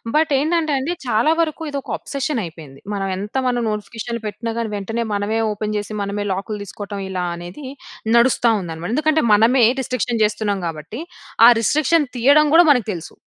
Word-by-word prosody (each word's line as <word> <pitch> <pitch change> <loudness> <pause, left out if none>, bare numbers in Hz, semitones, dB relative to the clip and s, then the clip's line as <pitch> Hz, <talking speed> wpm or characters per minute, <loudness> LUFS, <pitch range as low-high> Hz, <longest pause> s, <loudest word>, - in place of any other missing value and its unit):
But 310 -1 +2
ఏంటంటే 315 0 0
అండి 290 +7 -2
చాలా 235 +7 +3
వరకు 325 0 -2
ఇదొక 280 -1 -5
అబ్సెషన్ 275 -2 -3
అయిపోయింది. 155 -5 -10
మనం 195 -1 -2
ఎంత 205 +4 -7
మనం 245 -1 0
నోటిఫికేషన్లు 225 +2 -5
పెట్టినా 225 +2 -4
కానీ, 225 -2 -3
వెంటనే 225 +4 -3
మనమే 205 +2 -1
ఓపెన్ 210 0 -3
చేసి, 205 +1 -5
మనమే 205 +1 -3
లాకులు 205 +2 -4
తీసుకోవటం, 200 +1 -7
ఇలా 185 -1 -2
అనేది 175 +11 -9 0.5
నడుస్తా 235 -1 +4
ఉందనమాట. 165 +2 -6
ఎందుకంటే 310 -1 +2
మనమే 230 +3 +5 0.2
రిస్ట్రిక్షన్ 245 -2 -2
జేస్తున్నాం 210 -2 0
కాబట్టి 165 - -7 0.5
ఆ - - +10
రిస్ట్రిక్షన్ 305 +5 +2
తీయడం 285 +5 +5
గూడా 345 - +8
మనకు 245 -6 +2
తెలుసు. 170 -2 -8
225 Hz, 165 wpm, -20 LUFS, 200-270 Hz, 0.5 s, ఆ